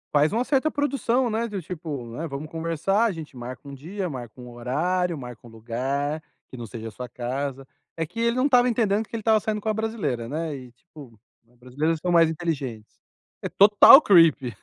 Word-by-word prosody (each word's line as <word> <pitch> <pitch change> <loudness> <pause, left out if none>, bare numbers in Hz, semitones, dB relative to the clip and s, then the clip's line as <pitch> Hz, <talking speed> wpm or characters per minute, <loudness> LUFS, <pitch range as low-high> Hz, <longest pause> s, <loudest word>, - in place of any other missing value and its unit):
Faz 150 +2 +4
uma 230 +3 0
certa 275 +2 +1
produção, 265 -4 0
né, 230 +1 -1
do 205 -3 -5
tipo, 155 -7 -6
né, 165 +4 -4
vamos 145 +1 -6
conversar, 165 +7 0
a 225 - +1
gente 160 -6 -9
marca 125 +3 -9
um 140 - -8
dia, 180 +8 -5
marca 125 -5 -8
um 125 - -10
horário, 165 +9 -1
marca 125 -4 -9
um 120 - -13
lugar 130 +7 -3 0.3
que - - -9
não 120 -2 -7
seja 115 +1 -7
a - - -13
sua 125 +4 -8
casa. 135 +3 -4 0.3
É 165 - -1
que 225 +9 -9
ele 235 0 +1
não 255 +2 +1
estava 250 -3 +4
entendendo 220 -2 0
que - - -8
ele 225 - -4
estava 220 0 +3
saindo 215 0 -2
com 220 - -3
a - - +1
brasileira, 200 - -3
né, 155 +1 -3
e, 130 -2 -11
tipo, 130 - -16 0.3
as 120 - -28
brasileiras 145 +7 -2
são 175 +3 -2
mais 165 -1 +5
inteligentes. 140 -10 -4 0.5
É - - -4
total 210 +6 +8
creepy. 160 - +4
160 Hz, 210 wpm, -24 LUFS, 125-210 Hz, 0.5 s, total